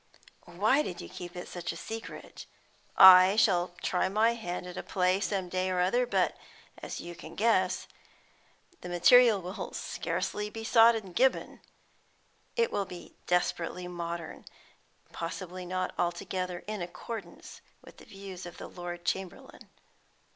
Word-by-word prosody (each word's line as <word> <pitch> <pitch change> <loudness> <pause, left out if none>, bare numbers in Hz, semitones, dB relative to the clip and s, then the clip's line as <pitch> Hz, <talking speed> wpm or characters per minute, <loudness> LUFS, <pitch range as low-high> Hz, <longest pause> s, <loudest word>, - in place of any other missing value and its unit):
"Why 210 +11 +2
did 180 -12 -5
you - - -7
keep 180 -1 -9
it 180 - -7
such 175 -1 -5
a - - -8
secret? 225 +5 -8 0.5
I 185 +1 +10
shall 180 -5 +2
try 185 +1 +1
my 220 +4 +3
hand 180 -6 -5
at 180 - -8
a - - -4
play 185 0 +1
some 195 -2 -2
day 185 +1 -1
or 185 -1 0
other, 240 +8 +2
but, - - +1 0.4
as - - -6
you 175 - -7
can 165 -1 -11
guess, 195 -4 +1 0.9
the 180 - -7
material 220 +5 +6
will 180 +2 -6
scarcely 210 0 -3
be 225 +1 -7
sought 230 0 +6
in 195 -5 -6
Gibbon. 260 +7 +1 1.0
It 465 -1 +1
will 200 - -1
be 180 -1 -11
desperately 180 0 -1
modern, 170 -2 -5 0.7
and - - -29
possibly 180 +1 -6
not 185 0 -2
altogether 175 +1 -2
in 215 -2 -4
accordance 180 +2 -8 0.2
with - - -15
the - - -14
views 195 -3 -9
of 175 - -11
the - - -8
Lord 175 -1 -7
Chamberlain. 190 -1 -5
185 Hz, 150 wpm, -29 LUFS, 175-210 Hz, 1.0 s, I